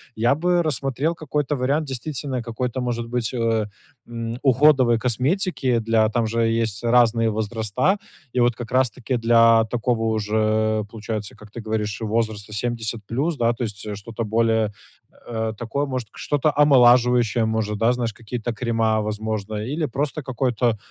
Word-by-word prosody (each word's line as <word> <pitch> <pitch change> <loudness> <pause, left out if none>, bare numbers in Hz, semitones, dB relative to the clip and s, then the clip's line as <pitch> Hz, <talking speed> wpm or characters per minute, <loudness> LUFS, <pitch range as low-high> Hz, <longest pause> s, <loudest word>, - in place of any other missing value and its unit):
я 120 +5 +2
бы 175 +3 +2
рассмотрел 145 +1 -1
какой-то 150 -2 -2
вариант 140 +4 0
действительно 135 -1 -4
какой-то, 125 +2 -3
может 120 -1 -2
быть, 120 -2 -2
э, 115 -3 +1 0.4
м, 115 0 -5
уходовой 130 -3 +4
косметики 140 - -1
для 115 -3 +2
там 115 0 0
же 115 +1 -1
есть 115 -2 -1
разные 115 -1 +3
возраста. 110 - 0 0.4
И 125 - +2
вот 120 0 +3
как 120 -1 -8
раз 130 0 +3
таки 125 +3 -3
для 115 -1 +5
такого 120 -1 0
уже 110 0 +1
получается, 110 -2 -5
как 105 -1 -15
ты 120 - -7
говоришь, 105 -2 -3
возраста 110 -1 -2
70 115 0 -3
плюс. 145 +7 -1
Да, 120 -1 +2
то 120 - -5
есть 105 -1 -5
что-то 115 +2 -5
более, 110 -1 +1 0.6
э, 110 -1 -2
такое, 120 +6 -2
может, 130 -5 -4
к - - -18
что-то 145 +1 +1
омолаживающее 125 -5 +5
может, 110 -1 -1
да, 115 +3 +3
знаешь, 120 -3 -2
какие-то 120 +1 -5
крема, 115 -2 0
возможно, 110 0 -3
или 135 +10 -2
просто 140 +3 -2
какой-то 125 -3 0
115 Hz, 155 wpm, -22 LUFS, 110-130 Hz, 0.6 s, для